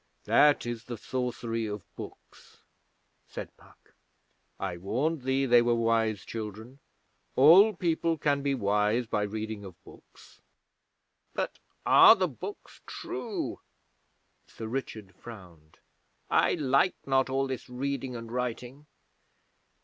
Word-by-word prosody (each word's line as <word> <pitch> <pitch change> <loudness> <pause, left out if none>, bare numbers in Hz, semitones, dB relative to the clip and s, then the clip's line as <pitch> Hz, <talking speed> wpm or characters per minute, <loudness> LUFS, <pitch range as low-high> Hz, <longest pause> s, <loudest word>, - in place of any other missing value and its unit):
'That 145 -3 +4
is 120 -1 -5
the 120 -2 -6
sorcery 115 -1 -3
of 105 -3 -5
books,' - - -12 0.6
said - - -8
Puck. - - -23 0.7
'I 85 - -3
warned 130 - -1
thee 130 +1 0
they 120 -2 +6
were 120 0 +2
wise 115 -3 0
children. 110 +4 -7 0.6
All 185 +10 +7
people 165 -1 0
can 145 -2 +1
be 140 -1 0
wise 105 +1 +1
by 110 -2 -1
reading 110 0 -4
of 95 -3 -10
books.' - - -18 0.9
'But - - -3 0.3
are - - +8
the - - 0
books - - -9
true?' - - -5 0.9
Sir 110 - -9
Richard 110 -5 -5
frowned. 90 -8 -13 0.5
'I - - +3
like 145 +3 +2
not 135 -1 +2
all 135 +1 0
this 130 -3 -6
reading 130 0 -3
and 115 -1 -8
writing.' 125 +3 -4
120 Hz, 120 wpm, -28 LUFS, 110-135 Hz, 0.9 s, are